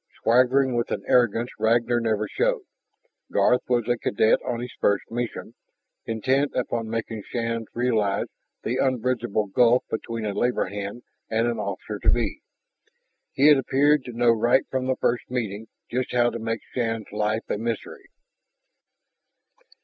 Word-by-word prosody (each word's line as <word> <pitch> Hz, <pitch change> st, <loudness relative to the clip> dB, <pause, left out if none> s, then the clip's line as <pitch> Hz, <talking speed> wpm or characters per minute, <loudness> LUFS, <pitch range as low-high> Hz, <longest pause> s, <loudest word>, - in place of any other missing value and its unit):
Swaggering 130 Hz, +2 st, +4 dB
with 120 Hz, -1 st, 0 dB
an 100 Hz, -, -3 dB
arrogance 120 Hz, -1 st, +2 dB
Ragnar 120 Hz, +2 st, +2 dB
never 110 Hz, -2 st, 0 dB
showed, -, -, 0 dB, 0.7 s
Garth 125 Hz, -, +3 dB
was 120 Hz, -3 st, +1 dB
a 120 Hz, -1 st, +1 dB
cadet 110 Hz, +1 st, +3 dB
on 120 Hz, -, -2 dB
his 125 Hz, 0 st, -6 dB
first 100 Hz, -1 st, +2 dB
mission, 120 Hz, 0 st, -4 dB, 0.5 s
intent 130 Hz, +6 st, +1 dB
upon 115 Hz, -3 st, -2 dB
making 115 Hz, -1 st, -3 dB
Shann 115 Hz, -1 st, -2 dB
realize 110 Hz, -5 st, +1 dB, 0.4 s
the 125 Hz, -, -1 dB
unbridgeable 120 Hz, -4 st, 0 dB
gulf 120 Hz, +5 st, +3 dB
between 115 Hz, 0 st, -3 dB
a 105 Hz, -, -2 dB
labor 125 Hz, +4 st, +1 dB
hand 100 Hz, +4 st, -6 dB, 0.3 s
and 115 Hz, +1 st, +1 dB
an 120 Hz, -2 st, -1 dB
officer 100 Hz, -1 st, -4 dB
to -, -, +2 dB
be. -, -, 0 dB, 0.9 s
He 140 Hz, -, +2 dB
had 150 Hz, -2 st, +7 dB
appeared 145 Hz, +2 st, +3 dB
to 125 Hz, -, -7 dB
know 120 Hz, 0 st, +4 dB
right 120 Hz, +3 st, +3 dB
from 130 Hz, -1 st, -1 dB
their 130 Hz, -, +1 dB
first 120 Hz, -1 st, -1 dB
meeting 110 Hz, -3 st, -3 dB, 0.2 s
just 125 Hz, +1 st, -2 dB
how 120 Hz, -1 st, +3 dB
to 115 Hz, -, -5 dB
make 115 Hz, 0 st, -3 dB
Shann's 115 Hz, -3 st, -2 dB
life 105 Hz, +1 st, -1 dB
a -, -, -2 dB
misery. 115 Hz, -1 st, -5 dB
120 Hz, 150 wpm, -25 LUFS, 110-125 Hz, 0.9 s, had